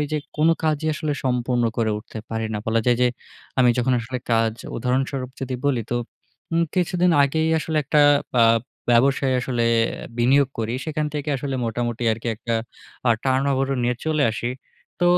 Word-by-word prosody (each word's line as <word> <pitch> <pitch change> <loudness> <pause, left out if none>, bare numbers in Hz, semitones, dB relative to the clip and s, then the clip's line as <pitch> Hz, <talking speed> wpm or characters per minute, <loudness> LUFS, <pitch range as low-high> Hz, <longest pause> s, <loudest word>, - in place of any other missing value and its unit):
ঐ - - +2
যে 150 - +1 0.2
কোন 155 +2 +3 0.2
কাজই 155 0 0
আসলে 150 0 -2
সম্পূর্ণ 125 -1 +1
করে 110 -2 +1
উঠতে 110 0 -9
পারি 110 0 -2
না। - - -1
বলা 115 0 +2
যায় 120 -1 +4
যে, 125 - +5 0.5
আমি 125 -1 +5
যখন 130 +1 +2
আসলে 125 +2 -4
কাজ, 115 -1 +2 0.2
উদাহরণস্বরূপ 130 +1 -1
যদি 130 -1 -3
বলি 130 -5 +1
তো, - - +1 0.6
উম 165 0 +3
কিছুদিন 180 0 +2
আগেই 160 +3 +1
আসলে 160 +1 -3
একটা 150 +1 +3 0.4
আ - - +7 0.5
ব্যবসায় 130 +2 +3
আসলে 120 -2 -1 0.5
বিনিয়োগ 135 +3 +4
করি। 115 +2 -1
সেখান 155 -1 -2
থেকে 150 0 -3
আসলে 135 0 -4
মোটামুটি 120 +1 -2
আরকি 115 +2 -4
একটা 115 +1 -3 0.5
আ - - +5
turnover 135 0 +1
ও - - -1
নিয়ে 120 0 0
চলে 155 -2 +1
আসি। 120 +2 -3 0.5
তো 175 - +3
130 Hz, 175 wpm, -23 LUFS, 120-145 Hz, 0.6 s, আ